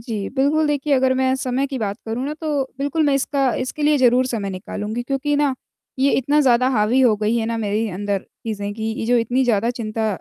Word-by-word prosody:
जी 220 -4 -4
बिल्कुल 300 +3 +2
देखिए 290 0 0
अगर 260 0 +3
मैं 260 0 +2
समय 265 +1 -1
की 270 -2 -5
बात 205 -2 -2
करूँ 235 +4 -3
ना 300 +2 -3
तो 295 -3 0 0.2
बिल्कुल 285 +3 0
मैं 280 - +3
इसका 275 -1 +1
इसके 260 +4 -4
लिए 295 0 +4
ज़रूर 255 0 +4
समय 215 -6 -3
निकालूँगी 210 +5 -5
क्योंकि 275 +3 -1
ना, 285 -2 +2 0.4
ये 275 +1 +3
इतना 285 +3 +2
ज़्यादा 255 -2 +4
हावी 235 +1 +2
हो 245 -4 +5
गई 215 +2 0
है 225 -1 -1
ना 230 0 -2
मेरी 215 +1 -1
अंदर 200 +1 -2 0.3
चीज़ें 205 -2 -3
कि 220 - -7 0.2
ये - - -2
जो 245 0 +3
इतनी 245 +3 +1
ज़्यादा 230 0 +1
चिंता 225 -2 -3
250 Hz, 225 wpm, -21 LUFS, 220-275 Hz, 0.4 s, हो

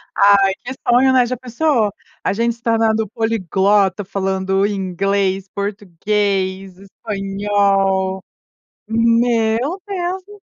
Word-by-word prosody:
Ai, 200 -1 +5
que 250 +2 -5
sonho, 255 +2 +4
né, 255 -1 +4
já 255 +1 -3
pensou 245 -2 0 0.3
a - - 0
gente 235 +2 0
se 235 - -27
tornando 225 -1 +1
poliglota, 205 -2 +1
falando 190 0 -1
inglês, 195 0 -1
português, 195 -1 -2
espanhol. 195 -1 -1 0.6
Meu 230 - +1
Deus 375 -1 -3
do 415 - -13
céu! - - -36
205 Hz, 110 wpm, -18 LUFS, 195-230 Hz, 0.6 s, Ai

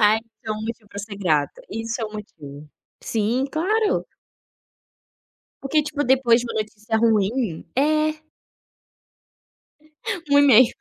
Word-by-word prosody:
Ah, 210 0 +6
isso 230 0 -29 0.2
é 215 - 0
um 215 0 -5
motivo 220 -1 -6
para 200 - -9
ser 200 -1 -8
grato. 155 -7 0
Isso 225 +3 -4
é 225 - -1
o 215 - -7
motivo, 150 -8 -10 0.3
sim, 230 +4 0
claro! 425 +8 +1 1.6
Porque 300 +3 +2
tipo 300 -1 -2
depois 250 -2 +4
de 245 - -5
uma 220 - -2
notícia 215 +1 -3
ruim 220 -3 +1
é. 305 +2 +2 2.1
Um 285 - +6
e-mail. 260 -4 +7
225 Hz, 135 wpm, -23 LUFS, 210-270 Hz, 2.1 s, e-mail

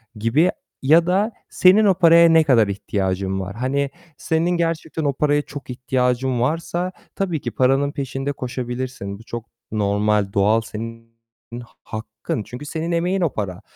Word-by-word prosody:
gibi. 125 +12 +2 0.3
Ya 165 +5 +5
da 200 +5 +2 0.2
senin 195 +4 +5
o 195 - +5
paraya 170 -1 +6
ne 165 -1 +6
kadar 120 -8 +4
ihtiyacın 95 -1 -2
var? 95 +2 -5
Hani, 135 +3 -1 0.3
senin 165 +2 0
gerçekten 165 -2 -1
o 140 -1 +1
paraya 145 +1 +2
çok 145 -2 -10
ihtiyacın 125 0 0
varsa 170 +6 -1 0.2
tabii 175 -6 -2
ki - - -4
paranın 135 +2 +2
peşinde 135 0 -3
koşabilirsin. 125 -5 -5
Bu - - -13
çok 115 0 -6 0.3
normal, 105 -1 +1
doğal. 105 +3 +3
Senin 115 +1 -8 0.5
ha - - -16 0.2
hakkın 110 0 -5
çünkü 125 +7 -9
senin 165 +3 -3
emeğin 180 +3 0
o 165 - +1
para 95 -2 -4
130 Hz, 155 wpm, -21 LUFS, 110-165 Hz, 0.5 s, paraya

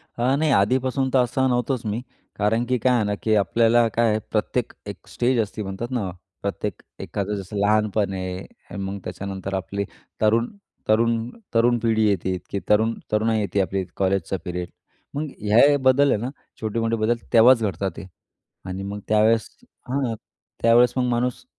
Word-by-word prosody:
अ, 125 +3 +2
नाही, 155 +1 +1
आधीपासून 130 +5 +2
तर 135 - +5
असं 130 +2 0
नव्हतोच 125 0 -1
मी, 110 +2 -2 0.3
कारण 110 +3 +1
की 125 +1 +1
काय 125 +2 +2
आहे 115 - +2
ना, 105 0 -1
की 110 -1 +3
आपल्याला 115 +4 +3
काय 115 +1 +3
आहे, 110 0 +1
प्रत्येक 115 +2 -1
एक 100 - -9
स्टेज 125 0 0
असते 105 0 -2
म्हणतात 95 +5 -5
ना, 115 -7 -1 0.3
प्रत्येक 100 -1 -3 0.2
एखादं 100 +1 -3
जसं 100 +1 -6
लहानपण 105 -1 +2
आहे, 95 +1 -7
मग 100 0 -4
त्याच्यानंतर 95 +1 -5
आपली 100 +1 -3 0.4
तरुण, 115 +2 +3 0.4
तरुण, 115 +1 +2 0.2
तरुण 120 +1 +4
पिढी 110 -1 +2
येते 95 -1 0
की 100 - -2
तरुण, 110 +2 +3 0.2
तरुणाई 110 +1 +2
येते, 100 -1 -1
आपली 95 +1 -1
कॉलेजचा 95 -1 0
पिरियड. 90 0 -4 0.4
मग 150 +2 -2
ह्या 105 +1 +1
हे 145 - +4
बदल 135 +1 +4
आहे - - +3
ना, 120 - -2 0.3
छोटे-मोठे 115 +1 0
बदल 110 +1 +1 0.2
तेव्हाच 115 +1 +7
घडतात 95 -1 -1
ते - - -7 0.6
आणि 95 +1 -4
मग 100 +1 -5
त्यावेळेस 110 +1 +3 0.4
हां, 130 -3 0 0.5
त्यावेळेस 120 +1 +5
मग 130 - +2
माणूस 125 - -1
110 Hz, 165 wpm, -23 LUFS, 100-120 Hz, 0.6 s, तेव्हाच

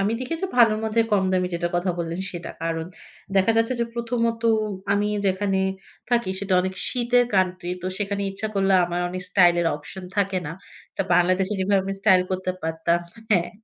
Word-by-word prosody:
আমি 200 +3 +1
দেখি 255 +6 -2
যে - - +1
ভালোর 225 -3 +5
মধ্যে 220 +1 +2
কম 195 -2 +3
দামি 185 -1 +2
যেটার 170 0 -2
কথা 180 +1 0
বললেন 170 +1 -3
সেটা। 175 -1 -6
কারণ 165 -1 -2 0.5
দেখা 195 +3 +4
যাচ্ছে 230 +3 +2
যে, - - +2
প্রথমত 230 -1 -1 0.5
আমি 205 +1 +1 0.2
যেখানে 195 0 +1 0.5
থাকি 235 -5 +2
সেটা 200 -2 0
অনেক 185 +1 -3
শীতের 245 0 +2
কান্ট্রি। 185 -2 +1
তো - - -3
সেখানে 200 -1 -2
ইচ্ছা 205 +3 -4
করলে 195 0 +2
আমার 175 0 -2
অনেক 180 +1 -5
স্টাইল 180 -3 +5
এর 170 - +1
অপশন 170 +5 -10
থাকে 195 -2 +1
না। 150 - -4 0.4
এটা - - -1
বাংলাদেশে 185 +2 +2
যেভাবে 195 +1 +2
আমি 195 - -2
স্টাইল 190 -3 +5
করতে 185 0 -1
পারতাম 160 +1 0 0.3
হ্যাঁ 180 -5 +2
190 Hz, 185 wpm, -24 LUFS, 180-210 Hz, 0.5 s, ভালোর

